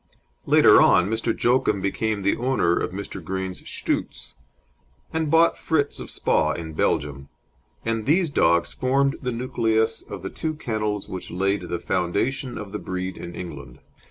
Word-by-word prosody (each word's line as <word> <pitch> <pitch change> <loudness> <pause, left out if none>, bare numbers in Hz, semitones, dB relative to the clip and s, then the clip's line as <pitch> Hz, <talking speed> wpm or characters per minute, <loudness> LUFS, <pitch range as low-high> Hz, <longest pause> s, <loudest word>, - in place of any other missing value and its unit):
Later - - +7
on 90 - +5
Mr. 115 +1 0
Joachim 120 -4 +2
became 100 +2 -1
the 100 - +2
owner 120 -9 +1
of - - -1
Mr. 95 -1 -7
Green's 95 +1 -4
Shtoots, - - -3 0.8
and 160 -1 0
bought 165 +2 +4
Fritz 145 -3 0
of - - -7
Spa - - +1
in 80 -2 -6
Belgium, 70 -2 -1 0.6
and 115 -1 -1
these 165 +1 +3
dogs 85 -8 +2
formed 135 +2 +1
the 125 - -2
nucleus 115 -2 0
of 100 -3 -9
the 95 - -5
two 160 -1 -3
kennels 105 -7 -2
which 95 - -6
laid 100 +3 -1
the 85 - -1
foundation 120 +10 -1
of 105 -2 -7
the 105 - -4
breed 95 +1 -4
in 85 - -8
England. 85 -8 -8
105 Hz, 155 wpm, -24 LUFS, 90-130 Hz, 0.8 s, Later